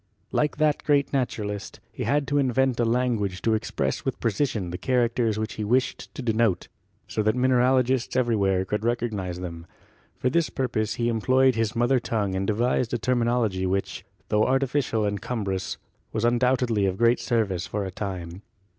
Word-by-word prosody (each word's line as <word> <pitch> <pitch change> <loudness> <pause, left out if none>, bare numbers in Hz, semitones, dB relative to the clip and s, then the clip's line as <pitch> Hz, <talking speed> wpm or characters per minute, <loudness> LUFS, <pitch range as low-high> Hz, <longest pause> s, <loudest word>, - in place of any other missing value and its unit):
Like 150 0 0
that 155 -1 +2
great 145 -1 +2
naturalist, 105 -6 -3
he - - -5
had 145 -1 +1
to 145 0 +2
invent 130 -1 +1
a 120 - +3
language 115 -6 0
to 115 - +2
express 110 - -1
with - - -3
precision 110 -5 -1
the 90 - -5
characters 120 -3 +1
which 110 0 -3
he - - 0
wished 125 +5 0
to 135 - -5
denote, 110 -5 +1 0.4
so - - -1
that 110 +2 +2
mineralogists 130 0 +2
everywhere 100 -7 +2
could 105 +3 -2
recognise 105 -7 -2
them. 85 -2 -7 0.5
For 125 - 0
this 170 0 +2
purpose 115 -5 -1
he 120 - 0
employed 130 +3 +3
his 115 0 -1
mother 120 +2 +3
tongue 105 -5 -1
and 95 +1 -1
devised 120 +2 +1
a - - +1
terminology 120 -6 +1
which, 95 +1 -2 0.3
tho 105 0 +3
artificial 130 -4 +1
and 100 -1 -2
cum 115 -4 -3
brous, 95 -1 -3 0.3
was 110 +1 -1
undoubtedly 120 -3 +2
of 95 0 -2
great 120 +2 +3
service 105 -8 -1
for 105 -1 -3
a 95 - -5
time. 90 -2 -5
115 Hz, 170 wpm, -25 LUFS, 100-125 Hz, 0.5 s, a